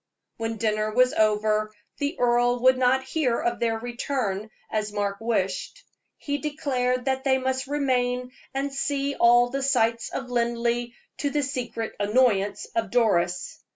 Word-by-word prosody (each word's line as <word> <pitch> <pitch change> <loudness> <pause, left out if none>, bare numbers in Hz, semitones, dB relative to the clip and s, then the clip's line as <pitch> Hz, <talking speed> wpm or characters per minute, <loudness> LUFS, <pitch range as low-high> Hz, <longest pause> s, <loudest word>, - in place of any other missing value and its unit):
When 225 0 -3
dinner 215 -1 0
was 250 +3 +3
over, 215 0 +2 0.3
the 285 +4 -1
earl 245 0 +2
would 260 0 +6
not 255 +1 +2
hear 260 -3 0
of 235 0 -1
their 230 -1 +1
return, 235 -3 -3 0.2
as 215 -1 -1
Mark 205 -1 -2
wished. 225 - -2 0.3
He 285 0 -3
declared 255 -4 -1
that 265 -1 0
they 265 -1 +3
must 260 +1 -2
remain 250 -3 0 0.2
and 275 +1 -2
see 280 0 -1
all 240 -1 +5
the 275 +1 -2
sights 235 -4 +1
of 260 -2 -5
Linleigh, 235 0 0 0.3
to 285 - 0
the 290 +1 0
secret 240 -4 -4
annoyance 205 -2 +2
of 225 -3 0
Doris. 180 -7 +1
245 Hz, 150 wpm, -25 LUFS, 220-265 Hz, 0.3 s, would